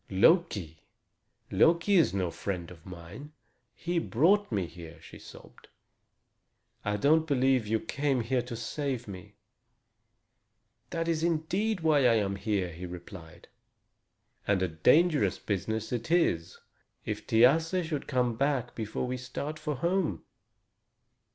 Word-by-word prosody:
"Loki! 100 - +2 0.7
Loki 170 +4 +3
is 170 -6 +5
no 95 -3 -1
friend 90 -3 -5
of 85 -1 -14
mine. 90 - -10 0.4
He 175 +5 -1
brought 170 - +2
me 100 -4 0
here," 85 -1 -11
she 80 - -13
sobbed. - - -15 1.2
"I 105 0 -1
don't 155 +8 +3
believe 130 -4 +2
you 110 +1 +1
came 135 -2 -1
to 125 0 -2
save 125 +1 -4
me." 95 -3 -10 1.5
"That 165 0 -2
is 165 -2 0
indeed 175 +5 0
why 150 -5 +4
I 115 - +4
am 100 -3 0
here," 100 -3 -1
he 90 +3 -7
replied, 85 -1 -11 1.0
"and 100 -2 +2
a - - +1
dangerous 125 - +3
business 110 +2 -3
it 120 +3 -3
is, 90 - +1 0.5
if - - -5
Thiasse 160 +10 +3
should 155 -3 -4
come 125 -3 0
back 135 -1 -1
before 110 +2 -4
we 125 +1 -3
start 145 +5 -6
for 150 -1 -3
home." 170 +4 -1
125 Hz, 130 wpm, -29 LUFS, 100-160 Hz, 1.5 s, is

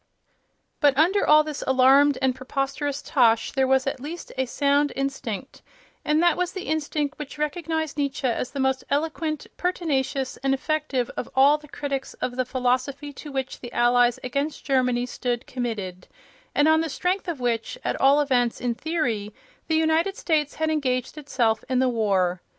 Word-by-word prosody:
But 285 -3 +4
under 365 +7 +3
all 305 0 +7
this 305 -2 -5
alarmed 265 +2 +5
and 260 -1 +3
preposterous 275 +2 -3
tosh 230 -5 +3
there 265 -1 +1
was 265 0 +3
at 270 -1 -2
least 315 +6 -7
a 260 0 -1
sound 285 +3 +2
instinct, 270 -3 -4 0.4
and 305 +2 +2
that 345 -2 +4
was 360 0 -1
the 375 - -5
instinct 300 -1 -2
which 295 0 -7
recognized 315 0 -2
Nietzsche 280 -1 -2
as 245 0 0
the 280 - -6
most 265 0 +1
eloquent, 310 +1 -1
pertinacious 280 -7 -1
and 270 +1 +1
effective 275 -4 -1
of - - -4
all 280 +3 +5
the 300 - -15
critics 280 -2 -4
of 245 - -3
the 255 0 0
philosophy 260 +3 -1
to 295 +2 -9
which 265 -1 -4
the 240 - -8
Allies 240 0 +3
against 280 +4 -3
Germany 250 -3 +1
stood 245 0 -3
committed, 205 -8 -5 0.5
and 290 - +4
on 315 0 +5
the 325 - -2
strength 365 +6 -1
of 335 -6 -3
which, 240 - -1
at - - -2
all 275 +2 +5
events 245 -5 +1
in 245 -1 -1
theory, 235 -8 -2 0.3
the 320 - +1
United 320 +4 +1
States 300 -3 0
had 315 0 0
engaged 255 -4 -1
itself 240 -7 0
in 255 - +1
the 260 +1 +3
war. 190 -6 +1
275 Hz, 175 wpm, -24 LUFS, 250-305 Hz, 0.5 s, all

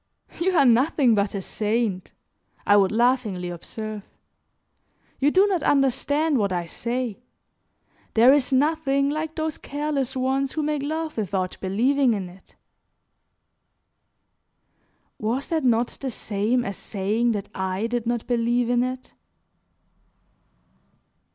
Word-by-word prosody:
"You 370 +2 +1
are 280 - +5
nothing 255 +1 +4
but 205 -1 0
a 195 - -3
saint," 210 -3 -2 0.5
I 205 - +5
would 195 -2 +4
laughingly 225 -6 +1
observe; 215 +5 -7 1.2
"you 280 - +4
do 375 +6 +4
not 380 -5 0
understand 285 +2 +2
what 200 -2 0
I 175 -1 -1
say. 235 +4 -4 1.0
There 240 +4 +7
is 285 -2 +1
nothing 280 0 +2
like 310 +1 -3
those 315 -1 -3
careless 285 -2 -3
ones 265 +1 0
who 310 - -2
make 300 -1 -1
love 315 +1 -3
without 190 -3 -2
believing 245 +6 +2
in 190 -3 -5
it." 185 +1 -19 2.6
Was 235 +6 -2
that 320 -2 0
not 240 -1 +2
the 270 - -2
same 225 +2 -1
as 200 -1 -4
saying 220 +4 -1
that 205 -1 -5
I 190 +2 -2
did 235 0 -2
not 240 -1 -1
believe 240 0 +1
in 245 0 +3
it? 255 0 -5
245 Hz, 125 wpm, -24 LUFS, 210-280 Hz, 2.6 s, There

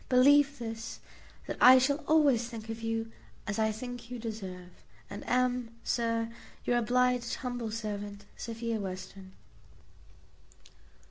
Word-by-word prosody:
Believe 280 +2 +6
this, 225 -1 -6 0.5
that - - -4
I 255 +1 +10
shall 280 +3 +2
always 280 -7 +4
think 225 -2 -8
of 225 0 -5
you 225 0 -2 0.3
as 210 +1 -2
I 220 0 +3
think 245 +1 -7
you 250 - -5
deserve, 190 -6 -6 0.4
and 205 - -6
am, 250 -2 +1
Sir, 230 -1 0 0.3
your 240 0 +3
obliged 250 +1 +2
humble 245 -3 -4
servant, 205 -2 -5
Sophia 230 -1 -3
Western. 190 0 -7
230 Hz, 125 wpm, -31 LUFS, 220-250 Hz, 0.5 s, I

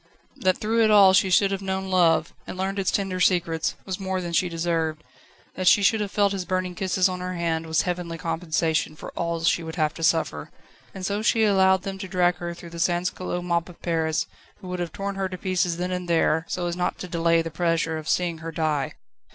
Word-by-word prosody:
That 185 -1 +1
through 225 +2 +1
it 220 - +4
all 200 -3 +7
she 190 0 +4
should 195 +2 +4
have 195 0 -2
known 190 0 -3
love, 175 -3 +3
and - - -6
learned 195 +1 -2
its 190 - +1
tender 195 -2 -1
secrets, 170 -3 +1
was 190 -1 -4
more 190 -1 -2
than 175 -2 -5
she 180 +1 +2
deserved. 165 -2 -1 0.5
That 185 -1 -3
she 205 - +6
should 215 +2 +3
have 205 - -2
felt 200 0 +2
his 190 -2 -2
burning 185 0 -2
kisses 185 0 +1
on 185 -1 -4
her 180 0 -4
hand 165 -1 -1
was 160 0 +1
heavenly 175 -2 -3
compensation 160 -2 -1
for - - -9
all 170 -1 -3
she 170 - +2
would 160 -1 -7
have 155 -3 +1
to - - -10
suffer. 160 - 0 0.5
And 190 -1 -5
so 205 +2 -1
she 225 0 +3
allowed 190 -2 +4
them 195 -1 -5
to 190 - -5
drag 180 -1 +2
her 170 0 -5
through 170 -1 -11
the 170 - -8
sansculotte 175 +1 -1
mob 170 0 -1
of 175 - -14
Paris, 160 -2 0 0.3
who 185 -3 -9
would 180 0 -4
have 175 -2 -3
torn 200 +3 -4
her 190 -1 -1
to 185 - -6
pieces 180 -2 0
then 180 +1 -2
and 180 -1 -3
there, 160 0 +2
so 180 - -2
as 170 0 -2
not 180 0 -1
to 185 - -7
delay 165 -1 +2
the 165 - -5
pleasure 165 -1 0
of 155 - -7
seeing 175 -2 0
her 165 +1 -6
die. 155 -3 -1
180 Hz, 235 wpm, -25 LUFS, 165-190 Hz, 0.5 s, all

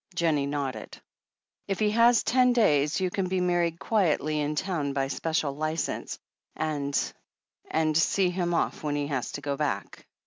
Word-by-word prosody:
Jennie 155 -5 +1
nodded. 135 -6 -4 0.7
"If 195 -2 -1
he 210 -1 +2
has 235 +1 +5
ten 250 0 +3
days 150 - +3
you 185 -1 0
can 190 -1 -1
be 185 0 0
married 175 -2 +1
quietly 155 -8 +1
in 150 +1 -1
town 150 -5 -1
by 135 0 -1
special 155 -2 -1
licence, 155 +2 -3 0.4
and 145 -3 -2 0.4
— - - -23
^and 155 -1 +1
see 180 +3 +3
him 175 -1 -1
off - - -1
when 150 -1 -2
he 145 0 -1
has 135 -4 -3
to 145 - -5
go 145 -1 -2
back." 150 0 -3
155 Hz, 170 wpm, -27 LUFS, 145-185 Hz, 0.7 s, has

